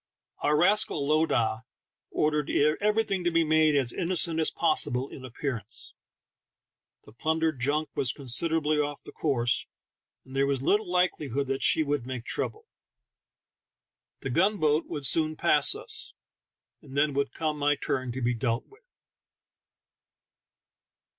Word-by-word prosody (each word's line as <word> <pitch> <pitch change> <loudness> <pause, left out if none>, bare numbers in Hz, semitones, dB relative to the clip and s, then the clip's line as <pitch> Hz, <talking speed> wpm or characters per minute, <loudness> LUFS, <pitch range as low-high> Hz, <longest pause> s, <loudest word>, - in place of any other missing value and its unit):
Our 150 +1 +2
rascal 175 -5 +3
lowdah 125 -8 +1 0.5
ordered 150 -1 0 0.3
everything 210 -3 +1
to 175 - +2
be 165 -1 +2
made 155 -1 +3
as 130 -4 +2
innocent 170 -2 0
as 160 - +3
possible 135 -5 0
in 130 - -10
appearance; 125 -3 -5 1.1
the - - -15
plundered 160 +3 -1
junk 150 +5 0
was 130 - +2
considerably 150 +3 +1
off 145 -1 -2
the - - -10
course, 120 -6 0 0.6
and 130 - -12
there 135 0 +2
was 135 -2 -1
little 205 +5 +2
likelihood 155 -7 0
that 135 0 -1
she 160 - +3
would 145 -4 -2
make 130 -2 -5
trouble. 435 +1 -3 1.6
The 135 - -4
gun 195 - +2
boat 155 -1 +1
would 145 -2 -5
soon 155 +2 +2
pass 155 - +4
us, 435 -1 -9 0.7
and 140 -2 -10
then 145 0 +2
would 140 0 -1
come 155 -2 -3
my 145 0 +2
turn 130 -2 -2
to 130 0 -4
be 120 +1 +2
dealt 115 0 -1
with. 485 +4 -23
150 Hz, 140 wpm, -27 LUFS, 135-165 Hz, 1.6 s, pass